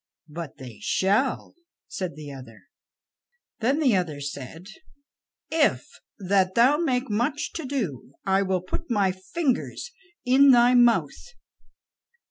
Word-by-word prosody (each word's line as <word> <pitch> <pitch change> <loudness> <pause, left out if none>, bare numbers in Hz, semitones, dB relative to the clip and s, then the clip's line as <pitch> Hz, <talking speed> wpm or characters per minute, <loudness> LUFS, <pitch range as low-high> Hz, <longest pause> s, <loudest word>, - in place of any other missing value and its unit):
"But 160 -1 -8
they 125 -5 -11
shall," 205 +8 0 0.3
said 185 -6 -5
the 150 -2 -9
other. 125 -5 -12 1.0
Then 250 +6 +1
the 260 -9 +3
other 165 -6 -2
said: 145 +4 -7 0.9
"If 310 -2 +2 0.3
that 190 -1 +1
thou 255 +5 +5
make 265 -6 0
much 240 +8 -2
to 325 - -5
do, 195 - -4
I 195 0 +2
will 190 -2 0
put 185 - -6
my 200 -5 +2
fingers 260 - -3 0.3
in 270 +3 +6
thy 245 -1 +6
mouth." 245 - +2
205 Hz, 120 wpm, -25 LUFS, 170-260 Hz, 1.0 s, in